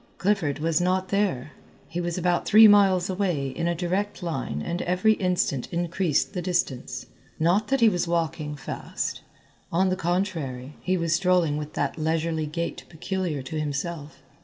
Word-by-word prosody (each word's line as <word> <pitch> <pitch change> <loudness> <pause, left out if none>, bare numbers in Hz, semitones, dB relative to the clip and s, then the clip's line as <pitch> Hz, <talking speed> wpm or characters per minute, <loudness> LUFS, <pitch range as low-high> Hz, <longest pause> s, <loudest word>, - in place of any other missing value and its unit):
Clifford 180 -8 +1
was 160 +1 +1
not 185 +1 +1
there. 190 -10 0 0.4
He 170 +2 -3
was 175 0 -2
about 175 -1 0
three 220 +1 +9
miles 195 -3 +5
away 180 -8 -1
in 165 +6 -2
a 170 - 0
direct 185 +4 -2
line 135 - -3
and 170 - -3
every 180 +5 +3
instant 180 - -1
increased 170 -1 0
the 180 - -2
distance. 140 -8 -2 0.3
Not 180 +7 +2
that 270 -1 +1
he 230 - +7
was 180 -4 +1
walking 165 -3 -1
fast, 135 - -4 0.5
on 185 +3 +2
the 185 - +1
contrary, 165 -8 -2
he 185 0 0
was 170 -2 0
strolling 180 -4 +2
with 150 0 -5
that - - -2
leisurely 160 0 0
gait 170 +3 -4
peculiar 170 -3 -3
to 155 +4 -4
himself. 150 0 -4
170 Hz, 160 wpm, -25 LUFS, 155-185 Hz, 0.5 s, three